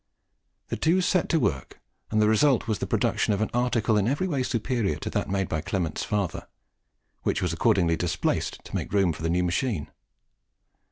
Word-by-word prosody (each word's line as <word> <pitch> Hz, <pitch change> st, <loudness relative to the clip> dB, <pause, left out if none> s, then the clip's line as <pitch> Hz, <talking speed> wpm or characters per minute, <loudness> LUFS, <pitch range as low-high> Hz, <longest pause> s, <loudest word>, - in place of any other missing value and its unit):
The -, -, -2 dB
two 170 Hz, +4 st, +3 dB
set 180 Hz, -1 st, +1 dB
to 165 Hz, -, +3 dB
work, 65 Hz, -, -2 dB, 0.3 s
and 110 Hz, -, +1 dB
the 105 Hz, -, +4 dB
result 120 Hz, +4 st, +3 dB
was 110 Hz, -3 st, -1 dB
the -, -, -3 dB
production -, -, +1 dB
of 100 Hz, -, -3 dB
an 110 Hz, -, -1 dB
article 120 Hz, -3 st, +1 dB
in 105 Hz, 0 st, +2 dB
every 145 Hz, +9 st, 0 dB
way 145 Hz, -7 st, -1 dB
superior 115 Hz, -, -1 dB
to -, -, -5 dB
that -, -, -1 dB
made 95 Hz, -1 st, 0 dB
by 80 Hz, -, -2 dB
Clement's 85 Hz, -2 st, -2 dB
father, 100 Hz, -5 st, -2 dB, 0.7 s
which -, -, 0 dB
was 90 Hz, -2 st, -1 dB
accordingly 85 Hz, -3 st, +2 dB
displaced 85 Hz, -1 st, -1 dB
to -, -, -12 dB
make -, -, -3 dB
room 95 Hz, -4 st, +3 dB
for 75 Hz, -, -10 dB
the 80 Hz, -, -1 dB
new 90 Hz, +2 st, +1 dB
machine. 85 Hz, -, -1 dB
105 Hz, 190 wpm, -26 LUFS, 85-125 Hz, 0.7 s, the